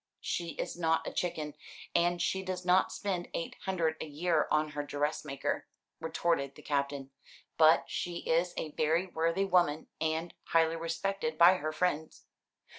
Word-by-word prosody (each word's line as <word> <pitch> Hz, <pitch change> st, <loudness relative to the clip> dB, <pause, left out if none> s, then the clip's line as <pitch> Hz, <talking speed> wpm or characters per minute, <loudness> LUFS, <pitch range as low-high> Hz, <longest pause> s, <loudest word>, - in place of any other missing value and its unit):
"She 170 Hz, -2 st, -2 dB
is -, -, -4 dB
not 165 Hz, -1 st, +1 dB
a -, -, -4 dB
chicken, 155 Hz, -4 st, -2 dB, 0.4 s
and 175 Hz, 0 st, +2 dB
she 190 Hz, +2 st, 0 dB
does 185 Hz, -1 st, -4 dB
not 185 Hz, +1 st, +4 dB
spend 185 Hz, -4 st, -2 dB
eight 165 Hz, -, -3 dB
hundred 165 Hz, -4 st, 0 dB
a -, -, -4 dB
year 155 Hz, +2 st, +1 dB
on 155 Hz, 0 st, +2 dB
her 145 Hz, 0 st, -3 dB
dressmaker," 145 Hz, -1 st, -2 dB, 0.3 s
retorted 160 Hz, -4 st, 0 dB
the 150 Hz, -, -13 dB
Captain. 140 Hz, -1 st, -2 dB, 0.4 s
"But 160 Hz, 0 st, +6 dB
she 175 Hz, -1 st, -3 dB
is 170 Hz, +2 st, +2 dB
a 155 Hz, -, -3 dB
very 160 Hz, +5 st, +1 dB
worthy 165 Hz, +2 st, 0 dB
woman, 175 Hz, -5 st, +2 dB
and 160 Hz, +2 st, -1 dB
highly 165 Hz, 0 st, +3 dB
respected 195 Hz, +7 st, -2 dB
by 175 Hz, +2 st, +8 dB
her 155 Hz, -1 st, -2 dB
friends. 160 Hz, -1 st, -1 dB
165 Hz, 155 wpm, -31 LUFS, 155-175 Hz, 0.4 s, by